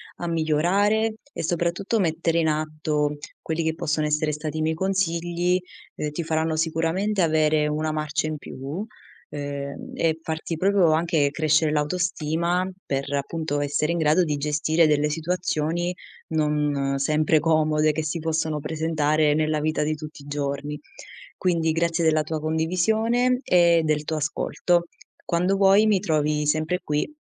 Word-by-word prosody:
a 175 - -5
migliorare 190 +8 +1 0.2
e - - -4
soprattutto 175 +6 0
mettere 165 -1 +1
in 160 - +2
atto 155 -1 -1 0.2
quelli 160 +1 -2
che 160 0 -1
possono 155 -1 -1
essere 150 +1 +1
stati 150 +1 -4
i - - -1
miei 160 +1 0
consigli, 175 -1 0 0.4
ehm, 150 -1 -3
ti 165 +3 -3
faranno 160 0 0
sicuramente 165 +6 0
avere 155 -2 +2
una 155 +1 -1
marcia 155 0 -1
in 155 -1 -3
più, 145 +9 -6 0.4
ehm, 140 -1 -6
e 160 -1 0
farti 160 +1 -4
proprio 190 -1 +3
anche 160 -3 +2
crescere 155 +1 +2
l'autostima 170 +3 0 0.2
per, 140 0 -2
appunto, 145 +1 -2
essere 145 +2 0
in 170 - -1
grado 160 +3 +3
di 150 -2 -1
gestire 155 +3 +2
delle 150 0 +2
situazioni 170 +1 -1 0.3
non 150 -3 0
sempre 155 +2 +2
comode 155 -1 +2
che 160 - -2
si 155 +2 -3
possono 160 -1 -1
presentare 155 -1 +1
nella 155 0 +1
vita 155 0 0
di 155 +1 -1
tutti 150 -1 -10
i - - -14
giorni. 145 0 -3 0.6
Quindi 165 -3 +1
grazie 170 +1 0
della 155 -1 +3
tua 160 0 -3
condivisione 220 +11 +1
e 170 -2 +4
del 155 -1 0
tuo 160 - -2
ascolto. 170 +3 0 0.4
Quando 180 +3 +1
vuoi 195 +2 +5
mi 205 -3 +3
trovi 150 -2 0
sempre 155 +4 0
qui 150 - -1
155 Hz, 150 wpm, -24 LUFS, 150-170 Hz, 0.6 s, vuoi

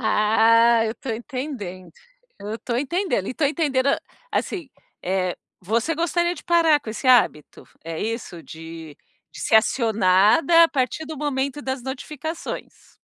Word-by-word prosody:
Ah, 225 +1 +4
eu 220 - -2
tô 265 - -6
entendendo, 220 - -6 0.5
eu 210 +2 -5
tô 235 0 -3
entendendo 290 - -1
e 255 - -4
tô 310 - 0
entendendo, 280 -3 +1 0.4
assim, 340 -8 -2 0.3
eh, 185 -1 -1 0.2
você 230 - 0
gostaria 345 +2 0
de - - -12
parar 330 -3 +4
com 230 -6 -7
esse 230 +4 -6
hábito, 235 - +3 0.2
é 165 -1 -5
isso? 220 -7 -4
De 160 -2 -10 0.4
de - - -10
ser 220 - +4
acionada 220 - +4
a 330 - +2
partir 270 +3 -1
do 315 - -7
momento 280 -1 -2
das 265 -2 -4
notificações? 295 +5 -7
250 Hz, 140 wpm, -23 LUFS, 210-295 Hz, 0.5 s, Ah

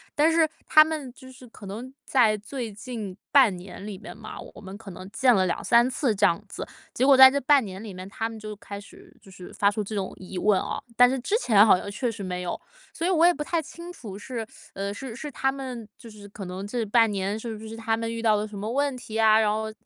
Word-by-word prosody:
但 310 +3 +4
是 325 -1 +4 0.2
他 310 0 +8
们 305 -5 -4
就 260 -1 -14
是 255 -1 -14
可 210 -2 -13
能 235 +7 -7
在 225 -5 +3
最 230 +1 -6
近 210 -3 -7 0.2
半 250 -9 +6
年 185 +2 -10
里 205 -3 -6
面 215 +2 -10
嘛， 215 0 -9 0.2
我 - - -11
们 195 +1 -9
可 210 -3 -10
能 185 +2 -10
见 245 +2 +4
了 190 -3 +3
2-3 235 +7 +3
次 250 -3 0
这 205 - +3
样 170 - +2
子。 - - -6 0.3
结 260 - +1
果 275 -2 +7
在 265 0 +11
这 280 +1 0
半 275 0 +4
年 190 +2 -8
里 205 -4 -8
面 185 +1 -8
他 225 +3 -3
们 225 - -9
就 215 0 -7
开 200 0 -9
始 205 - -16
就 195 - -17
是 185 -2 -11
发 200 - +3
出 210 0 -2
这 215 - -7
种 190 -2 -2
疑 185 0 -8
问 200 +1 +3
哦。 - - -4
但 245 0 +7
是 265 0 -1
之 340 - -1
前 215 - +5
好 195 - +6
像 200 - -6
确 240 +2 -2
实 205 -3 -7
没 180 -1 -4
有， 175 - -4 0.3
所 330 - -3
以 - - +2
我 340 -2 +4
也 350 - +6
不 295 - -4
太 335 +1 -1
清 340 +3 -10
楚 205 - -9
是， 230 +1 -5 0.3
呃， 200 +1 -3
是 235 +1 -7
是 295 +2 -7
他 270 +1 0
们， 255 -5 -7
就 235 - -12
是 205 -1 -12
可 200 -1 -8
能 185 +2 -6
这 230 0 -2
半 225 +1 +4
年 200 +2 -2
是 225 -1 -5
不 220 +1 -10
是 225 - -7
他 225 0 -1
们 230 0 -3
遇 230 - -4
到 220 -2 +4
了 210 +1 -1
什 205 -1 -9
么 215 +3 -4
问 280 0 0
题 225 -3 -6
啊， 220 0 +6
然 210 -1 +2
后 220 0 -2
220 Hz, 285 characters per minute, -25 LUFS, 200-260 Hz, 0.3 s, 在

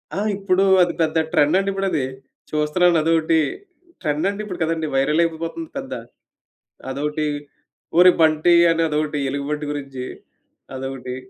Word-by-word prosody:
ఆ! - - -1 0.2
ఇప్పుడు 195 -1 +1 0.2
అది 175 -1 +2
పెద్ద 160 0 +1
ట్రెండ్ 150 +4 +3
అండి 195 0 -1
ఇప్పుడది. 195 -8 -1 0.5
చూస్తున్నాను 165 +3 +2
అదొకటి. 160 0 +2 0.6
ట్రెండ్ 155 +2 0
అండి 205 +1 -4
ఇప్పుడు 185 -4 -7
కదండీ! 160 -1 -1
వైరల్ 150 +5 +2
అయిపోతుంది 165 - -4
పెద్ద. 270 -1 -5 1.0
అదొకటి 150 +2 -2 0.7
ఒరేయ్ 180 0 +7
బంటి! 160 +2 +4 0.2
అని 165 0 +1
అదొకటి 150 -1 -1
ఎలుగుబంటి 150 +2 -3
గురించి. 135 -3 -6 0.7
అదొకటి. 130 -1 -5
160 Hz, 130 wpm, -21 LUFS, 150-175 Hz, 1.0 s, ఒరేయ్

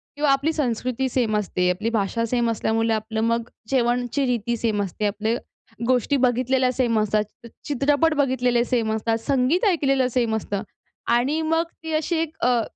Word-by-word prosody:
किंवा 290 -1 +2
आपली 280 +4 +1
संस्कृती 255 -2 -1
सेम 230 -4 +1
असते. 180 -3 0
आपली 210 +5 -2
भाषा 230 +1 0
सेम 235 0 0
असल्यामुळे 225 +1 0
आपलं 220 0 -2
मग 230 0 0 0.2
जेवणाची 245 +2 +1
रीती 235 -1 -1
सेम 215 -3 0
असते. 200 +2 -4
आपले 215 +3 -1 0.5
गोष्टी 255 +2 +2
बघितलेल्या 255 +1 +2
सेम 235 -3 +1
असतात. 215 0 +1 0.4
चित्रपट 290 +3 +2
बघितलेले 250 -4 +2
सेम 230 -3 0
असतात. 225 +1 0
संगीत 275 - +2
ऐकलेलं 275 -8 +2
सेम 230 -2 +1
असतं. 205 -1 -3 0.4
आणि 265 +7 +2
मग 325 +1 +1 0.2
ती 320 - -5
अशी 320 +2 0
एक 320 -1 -4
अ, 245 -2 +3
245 Hz, 160 wpm, -23 LUFS, 225-275 Hz, 0.5 s, अ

